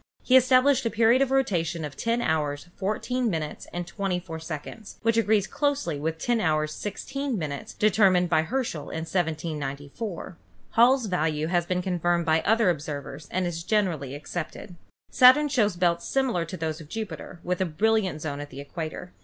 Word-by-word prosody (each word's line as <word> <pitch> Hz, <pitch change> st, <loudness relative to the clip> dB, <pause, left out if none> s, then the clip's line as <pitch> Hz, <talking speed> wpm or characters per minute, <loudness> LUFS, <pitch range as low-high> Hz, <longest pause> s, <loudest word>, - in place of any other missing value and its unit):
He 255 Hz, -, +4 dB
established 260 Hz, +1 st, +5 dB
a -, -, +1 dB
period 230 Hz, +3 st, +4 dB
of 275 Hz, -, +3 dB
rotation 175 Hz, -12 st, 0 dB
of 145 Hz, -2 st, -8 dB
10 230 Hz, -, 0 dB
hours, 150 Hz, 0 st, -1 dB
14 235 Hz, +5 st, -1 dB
min. 160 Hz, -5 st, -2 dB, 0.2 s
and 175 Hz, 0 st, -4 dB
24 180 Hz, -4 st, -3 dB
sec, 160 Hz, +2 st, -6 dB, 0.3 s
which 230 Hz, 0 st, +3 dB
agrees 215 Hz, -3 st, +3 dB
closely 285 Hz, -, -1 dB
with 160 Hz, +2 st, -2 dB
10 235 Hz, +6 st, 0 dB
hours, 155 Hz, -3 st, +1 dB
16 265 Hz, -, -4 dB
min. 145 Hz, -5 st, -4 dB
determined 195 Hz, -4 st, +4 dB
by 160 Hz, -2 st, +3 dB
Her 260 Hz, +11 st, -1 dB
schel 155 Hz, -10 st, -5 dB
in 160 Hz, 0 st, -4 dB
1794. 160 Hz, -, -4 dB, 0.3 s
Hall's 245 Hz, +2 st, +5 dB
value 160 Hz, -5 st, 0 dB
has 175 Hz, -1 st, +2 dB
been 180 Hz, 0 st, -1 dB
confirmed 175 Hz, -2 st, 0 dB
by 160 Hz, 0 st, +3 dB
other 220 Hz, 0 st, +3 dB
observers 145 Hz, -2 st, -6 dB
and 185 Hz, 0 st, -1 dB
is 170 Hz, -1 st, -3 dB
generally 170 Hz, -, 0 dB
accepted. 170 Hz, +4 st, -6 dB, 0.4 s
Saturn 270 Hz, +3 st, +7 dB
shows 215 Hz, -8 st, +2 dB
belts 170 Hz, -1 st, +1 dB
similar 255 Hz, -11 st, 0 dB
to 185 Hz, +3 st, -7 dB
those 160 Hz, 0 st, -3 dB
of 150 Hz, -, -13 dB
Jupiter, 215 Hz, -4 st, -6 dB
with 180 Hz, +1 st, -1 dB
a -, -, +3 dB
brilliant 185 Hz, -1 st, +1 dB
zone 145 Hz, -2 st, -3 dB
at 145 Hz, 0 st, -7 dB
the 135 Hz, -, -10 dB
equator. 160 Hz, +4 st, -6 dB
175 Hz, 170 wpm, -26 LUFS, 160-225 Hz, 0.4 s, Saturn